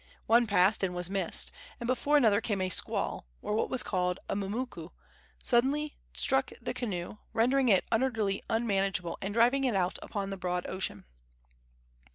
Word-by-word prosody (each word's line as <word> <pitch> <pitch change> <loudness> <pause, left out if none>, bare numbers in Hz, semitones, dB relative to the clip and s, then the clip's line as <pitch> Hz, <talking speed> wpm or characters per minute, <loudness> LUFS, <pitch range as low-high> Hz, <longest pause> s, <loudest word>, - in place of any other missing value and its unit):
One 235 +1 +4
passed 200 0 +4
and 180 -2 0
was 180 +1 -2
missed, 195 -1 0 0.3
and 240 - -5
before 270 +4 +2
another 220 -6 +4
came 205 -4 -1
a 185 0 0
squall, 65 - -1
or - - -3
what 220 - 0
was 255 - +1
called 180 -1 -1
a - - -2
mumuku, 200 -3 -4 0.5
suddenly 280 +5 +2 0.2
struck - - +2
the - - -4
canoe, 200 -5 -4 0.2
rendering 255 +3 +3
it 195 -3 +4
utterly 220 -5 +1
unmanageable 195 -6 0
and 195 - -3
driving 240 +5 +3
it 250 -5 +1
out 180 -1 0
upon 200 -2 -4
the 195 - -4
broad 180 -1 -2
ocean. 185 - -4
205 Hz, 165 wpm, -30 LUFS, 185-240 Hz, 0.5 s, One